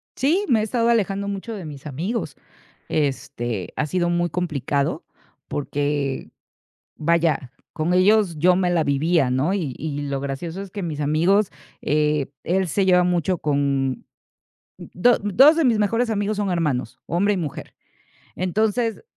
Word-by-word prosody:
Sí, 330 Hz, +10 st, +1 dB
me 230 Hz, -, +4 dB
he -, -, 0 dB
estado 230 Hz, +2 st, +1 dB
alejando 200 Hz, -3 st, +1 dB
mucho 200 Hz, +3 st, -4 dB
de 195 Hz, -5 st, -7 dB
mis 145 Hz, -1 st, -9 dB
amigos. 180 Hz, -, -3 dB, 0.5 s
Este, 120 Hz, -, -2 dB
ha 150 Hz, -, 0 dB
sido 175 Hz, +2 st, 0 dB
muy 175 Hz, -1 st, 0 dB
complicado, 145 Hz, -5 st, -1 dB, 0.4 s
porque, 145 Hz, -1 st, -2 dB, 0.7 s
vaya, 160 Hz, -5 st, +1 dB, 0.2 s
con 165 Hz, +3 st, -1 dB
ellos, 190 Hz, -1 st, +4 dB
yo 180 Hz, +4 st, +4 dB
me 180 Hz, -1 st, +1 dB
la 170 Hz, -2 st, +2 dB
vivía, 145 Hz, 0 st, +2 dB
¿no? 135 Hz, +8 st, +1 dB
Y 160 Hz, -10 st, -2 dB
y 145 Hz, -2 st, -4 dB
lo 140 Hz, -1 st, -2 dB
gracioso 160 Hz, +7 st, -5 dB
es 200 Hz, -, -8 dB
que 200 Hz, -1 st, -5 dB
mis 155 Hz, -3 st, -4 dB
amigos, 170 Hz, +8 st, +2 dB, 0.3 s
eh, 150 Hz, -1 st, +1 dB, 0.2 s
él 185 Hz, +1 st, +1 dB
se 190 Hz, +4 st, +1 dB
lleva 180 Hz, -1 st, +5 dB
mucho 180 Hz, 0 st, +1 dB
con 140 Hz, -3 st, 0 dB, 0.7 s
do 245 Hz, +7 st, +2 dB
2 265 Hz, -, +6 dB
de 330 Hz, -, +2 dB
mis 235 Hz, -4 st, +3 dB
mejores 230 Hz, +3 st, +1 dB
amigos 205 Hz, 0 st, -1 dB
son 205 Hz, -2 st, -1 dB
hermanos, 140 Hz, -9 st, -1 dB
hombre 200 Hz, +5 st, +1 dB
y -, -, -3 dB
mujer. 155 Hz, -6 st, -5 dB, 0.6 s
Entonces, 215 Hz, -, 0 dB
175 Hz, 155 wpm, -22 LUFS, 145-200 Hz, 0.7 s, 2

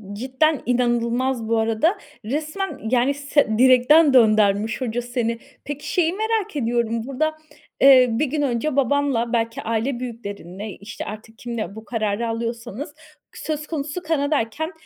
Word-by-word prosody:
Cidden 265 Hz, +6 st, +1 dB
inanılmaz 240 Hz, 0 st, 0 dB
bu 230 Hz, 0 st, +1 dB
arada. 225 Hz, -, +1 dB, 0.3 s
Resmen, 310 Hz, -, -3 dB
yani, 255 Hz, +2 st, +3 dB
se 280 Hz, -6 st, +1 dB
direkten 260 Hz, +4 st, +6 dB
döndürmüş 215 Hz, -1 st, +3 dB
hoca 240 Hz, -1 st, -1 dB
seni. 240 Hz, -1 st, -2 dB, 0.2 s
Peki, 290 Hz, 0 st, -6 dB
şeyi 340 Hz, -2 st, +2 dB
merak 435 Hz, -3 st, -1 dB
ediyorum, 235 Hz, -3 st, 0 dB
burada, 310 Hz, +4 st, -1 dB, 0.4 s
eee, 260 Hz, -2 st, +8 dB
1 235 Hz, +7 st, +1 dB
gün 290 Hz, +2 st, -2 dB
önce 270 Hz, +2 st, -1 dB
babanla, 275 Hz, -3 st, +1 dB
belki 230 Hz, +3 st, -1 dB
aile 230 Hz, +3 st, -1 dB
büyüklerinle, 205 Hz, -4 st, -7 dB
işte, 205 Hz, +1 st, -8 dB
artık 220 Hz, +1 st, -9 dB
kiminle 225 Hz, -5 st, -5 dB
bu 220 Hz, +1 st, -10 dB
kararı 220 Hz, -1 st, -1 dB
alıyorsanız, 230 Hz, +4 st, -4 dB, 0.4 s
söz 305 Hz, -1 st, -4 dB
konusu 300 Hz, +2 st, -4 dB
Kanada'yken 300 Hz, -, -1 dB
245 Hz, 135 wpm, -22 LUFS, 225-290 Hz, 0.4 s, eee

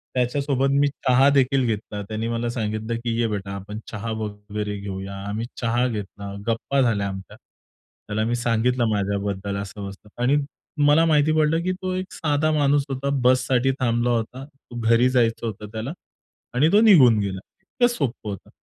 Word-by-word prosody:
त्याच्यासोबत 135 Hz, +2 st, +1 dB
मी 145 Hz, -, +4 dB
चहा 135 Hz, -1 st, +3 dB
देखील 135 Hz, 0 st, +3 dB
घेतला, 105 Hz, -1 st, -3 dB
त्याने 110 Hz, +1 st, -3 dB
मला 115 Hz, 0 st, -1 dB
सांगितलं 110 Hz, -1 st, -2 dB
की 115 Hz, -1 st, -1 dB
"ये 115 Hz, -, +2 dB
बेटा, 100 Hz, -2 st, -4 dB
आपण 105 Hz, +2 st, -7 dB
चहा 110 Hz, +1 st, -4 dB
वगैरे 105 Hz, -1 st, -4 dB
घेऊया." 100 Hz, 0 st, -6 dB
आम्ही 110 Hz, +3 st, -3 dB
चहा 120 Hz, +2 st, +1 dB
घेतला, 100 Hz, -2 st, -6 dB
गप्पा 135 Hz, +4 st, 0 dB
झाल्या 105 Hz, -5 st, +1 dB
आमच्या. 95 Hz, 0 st, -8 dB, 0.7 s
त्याला 110 Hz, +1 st, -1 dB
मी 120 Hz, +1 st, 0 dB
सांगितलं 120 Hz, +1 st, +1 dB
माझ्याबद्दल 100 Hz, -1 st, -2 dB
असं-बसं. 100 Hz, +1 st, -8 dB, 0.2 s
आणि 135 Hz, +4 st, +4 dB, 0.5 s
मला 155 Hz, +3 st, +5 dB
माहिती 155 Hz, -1 st, +3 dB
पडलं 155 Hz, +2 st, +2 dB
की 185 Hz, -, 0 dB
तो 185 Hz, 0 st, -2 dB
एक 185 Hz, 0 st, -4 dB
साधा 150 Hz, 0 st, +1 dB
माणूस 145 Hz, -1 st, +3 dB
होता; 135 Hz, +1 st, -2 dB
बससाठी 130 Hz, +1 st, +3 dB
थांबला 120 Hz, -1 st, +1 dB
होता, 120 Hz, +3 st, -2 dB, 0.3 s
घरी 115 Hz, +2 st, +4 dB
जायचं 120 Hz, -2 st, +1 dB
होतं 105 Hz, 0 st, -6 dB
त्याला 115 Hz, +5 st, -4 dB, 0.6 s
आणि 150 Hz, +6 st, +4 dB
तो 210 Hz, +2 st, +6 dB
निघून 135 Hz, -, +7 dB
गेला. 100 Hz, -2 st, -2 dB, 0.2 s
इतकं 240 Hz, +5 st, +1 dB
सोपं 125 Hz, -, -3 dB
होतं. 100 Hz, -, -7 dB
115 Hz, 160 wpm, -23 LUFS, 105-135 Hz, 0.7 s, निघून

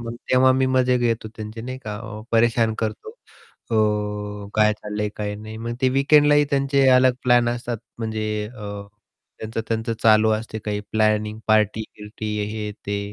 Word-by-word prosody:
मग 115 Hz, 0 st, -6 dB, 0.2 s
तेव्हा 130 Hz, 0 st, +5 dB
मी 130 Hz, 0 st, +2 dB
मजे 125 Hz, 0 st, +3 dB
घेतो 115 Hz, -2 st, -1 dB
त्यांचे 110 Hz, +1 st, -7 dB
नाही 130 Hz, +3 st, -6 dB
का 105 Hz, -1 st, -5 dB, 0.3 s
परेशान 115 Hz, -1 st, +3 dB
करतो. 110 Hz, -, -4 dB, 0.6 s
अ, -, -, 0 dB, 0.8 s
काय 105 Hz, 0 st, +4 dB
चाललंय, 105 Hz, 0 st, -4 dB
काय 105 Hz, -1 st, -3 dB
नाही 110 Hz, +1 st, -9 dB
मग 115 Hz, +1 st, -4 dB
ते 130 Hz, -, +3 dB
वीकेंडलाही 145 Hz, +1 st, +5 dB
त्यांचे 140 Hz, -1 st, +2 dB
अलग 130 Hz, 0 st, +5 dB
प्लॅन 120 Hz, -1 st, +4 dB
असतात 120 Hz, -1 st, -3 dB, 0.2 s
म्हणजे 110 Hz, -1 st, -3 dB, 0.3 s
अ, 100 Hz, -1 st, -6 dB, 0.6 s
त्यांचं-त्यांचं 115 Hz, +1 st, -3 dB
चालू 110 Hz, 0 st, +5 dB
असते 110 Hz, 0 st, -3 dB
काही 105 Hz, -1 st, -3 dB
प्लॅनिंग 110 Hz, 0 st, +1 dB
पार्टी-बिर्टी 105 Hz, 0 st, -1 dB, 0.2 s
हे 105 Hz, -1 st, -4 dB, 0.2 s
ते 100 Hz, 0 st, -1 dB
110 Hz, 145 wpm, -22 LUFS, 105-125 Hz, 0.8 s, तेव्हा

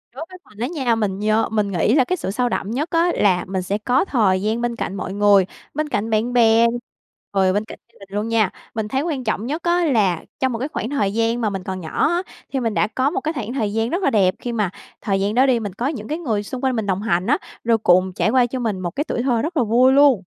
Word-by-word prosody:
Đối 305 Hz, +5 st, -6 dB
với 370 Hz, -, -11 dB
mình 210 Hz, -, -19 dB
đó 240 Hz, -, 0 dB
nha, 250 Hz, -7 st, +1 dB
mình 200 Hz, -3 st, -2 dB
nhớ 215 Hz, +1 st, +1 dB
mình 210 Hz, -2 st, 0 dB
nghĩ 180 Hz, +6 st, +2 dB
là 270 Hz, -, +5 dB
cái 365 Hz, +8 st, -2 dB
sự 190 Hz, -, -3 dB
sâu 245 Hz, +3 st, 0 dB
đậm 205 Hz, 0 st, -3 dB
nhất 295 Hz, +7 st, -2 dB
á 340 Hz, +1 st, +3 dB
là 185 Hz, -3 st, +2 dB
mình 190 Hz, -1 st, -2 dB
sẽ 195 Hz, +3 st, -2 dB
có 245 Hz, -, +1 dB
thời 200 Hz, -, +2 dB
gian 220 Hz, +3 st, -1 dB
bên 240 Hz, 0 st, -1 dB
cạnh 195 Hz, -, -4 dB
mọi 185 Hz, -, -4 dB
người, 200 Hz, -2 st, +4 dB, 0.3 s
bên 300 Hz, +1 st, -2 dB
cạnh 220 Hz, -4 st, -1 dB
bạn 220 Hz, +3 st, 0 dB
bè, 230 Hz, -1 st, +5 dB, 0.7 s
rồi 190 Hz, -1 st, +3 dB
bên 205 Hz, +2 st, 0 dB
cạnh -, -, -11 dB
gia -, -, -23 dB
đình 195 Hz, -1 st, -14 dB
luôn 215 Hz, -, -1 dB
nha. 225 Hz, -4 st, +2 dB, 0.3 s
Mình 220 Hz, -1 st, -2 dB
thấy 265 Hz, +4 st, -1 dB
quan 295 Hz, -5 st, -3 dB
trọng 220 Hz, 0 st, -2 dB
nhất 310 Hz, +5 st, -3 dB
á 345 Hz, 0 st, +2 dB
là 205 Hz, -, +1 dB, 0.2 s
trong 260 Hz, -1 st, +1 dB
một 230 Hz, -, -3 dB
cái 270 Hz, -, -2 dB
khoảng 235 Hz, -, -4 dB
thời 205 Hz, -9 st, 0 dB
gian 230 Hz, +2 st, 0 dB
mà 215 Hz, -, +1 dB
mình 195 Hz, -2 st, -5 dB
còn 185 Hz, 0 st, -4 dB
nhỏ 160 Hz, -, 0 dB
á, 350 Hz, +2 st, 0 dB, 0.3 s
thì 265 Hz, -, +1 dB
mình 225 Hz, -3 st, -1 dB
đã -, -, +2 dB
có 260 Hz, +5 st, 0 dB
một -, -, -2 dB
cái 315 Hz, +1 st, -2 dB
khoảng 240 Hz, -4 st, -4 dB
thời 215 Hz, -6 st, -1 dB
gian 225 Hz, +1 st, 0 dB
rất 355 Hz, +6 st, -2 dB
là -, -, +4 dB
đẹp. 190 Hz, -4 st, +2 dB
Khi 245 Hz, -, -4 dB
mà 210 Hz, -5 st, 0 dB, 0.3 s
thời 195 Hz, -3 st, 0 dB
gian 205 Hz, +2 st, 0 dB
đó 260 Hz, +2 st, +5 dB
đi, 250 Hz, -3 st, +3 dB
mình 205 Hz, -4 st, -5 dB
có 240 Hz, +6 st, -2 dB
những 235 Hz, -8 st, -4 dB
cái 310 Hz, -, -2 dB
người 220 Hz, -11 st, -2 dB
xung 250 Hz, +5 st, -6 dB
quanh 260 Hz, -1 st, +1 dB
mình 220 Hz, -3 st, -1 dB
đồng 190 Hz, 0 st, -1 dB
hành 185 Hz, -3 st, 0 dB
á, 295 Hz, +5 st, +3 dB, 0.3 s
rồi 230 Hz, -1 st, +3 dB
cùng 185 Hz, -2 st, +3 dB
trải -, -, +1 dB
qua 255 Hz, -2 st, +4 dB
cho 255 Hz, +2 st, -4 dB
mình 215 Hz, -6 st, -2 dB
một 175 Hz, -2 st, -3 dB
cái 290 Hz, -, 0 dB
tuổi 245 Hz, -5 st, -3 dB
thơ 240 Hz, -4 st, +1 dB
rất 320 Hz, +3 st, -3 dB
là 250 Hz, -, +4 dB
vui 245 Hz, +4 st, +4 dB
luôn. 275 Hz, -8 st, +5 dB
225 Hz, 290 wpm, -21 LUFS, 205-260 Hz, 0.7 s, là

